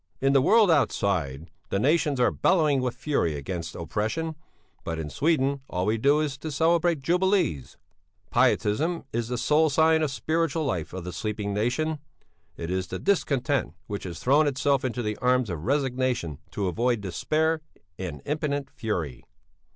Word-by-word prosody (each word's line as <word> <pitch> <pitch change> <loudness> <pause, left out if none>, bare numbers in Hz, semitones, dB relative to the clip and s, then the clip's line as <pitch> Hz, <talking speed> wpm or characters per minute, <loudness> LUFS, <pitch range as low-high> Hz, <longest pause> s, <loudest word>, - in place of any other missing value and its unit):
"'In 135 +1 +2
the 135 - +5
world 215 - +5
outside 85 - 0 0.2
the - - 0
nations 145 +3 +2
are 125 - +4
bellowing 155 -7 +2
with 125 -1 -2
fury 135 - 0
against 85 +4 -5
oppression; 110 - -2 0.5
but 80 - -3
in 75 -2 -5
Sweden 140 - +1
all 90 +1 -1
we 110 +2 +1
do 145 +5 +4
is 140 -3 -3
to 160 - -5
celebrate 165 +1 +2
jubilees. 175 - +1 0.5
"'Pietism 130 +6 +2
is 115 0 -1
the 125 +1 -2
sole 155 +5 +3
sign 160 +2 +4
of 155 - +1
spiritual 160 +2 -1
life 90 - -2
of 95 -1 -6
the 90 0 -6
sleeping 100 +2 -3
nation; 140 +9 0 0.6
it 85 +1 -4
is 95 0 -1
the - - -4
discontent 140 - 0
which 100 -1 -5
has 85 -2 -6
thrown 145 +4 +3
itself 140 0 +1
into 125 -1 -2
the 105 -1 -2
arms 125 -4 +2
of 80 -2 -5
resignation 130 - 0
to 100 -2 -2
avoid 120 +5 +1
despair 155 - 0 0.4
and 85 -7 -5
impotent 145 -2 -2
fury. 80 - -3
130 Hz, 160 wpm, -26 LUFS, 100-155 Hz, 0.6 s, the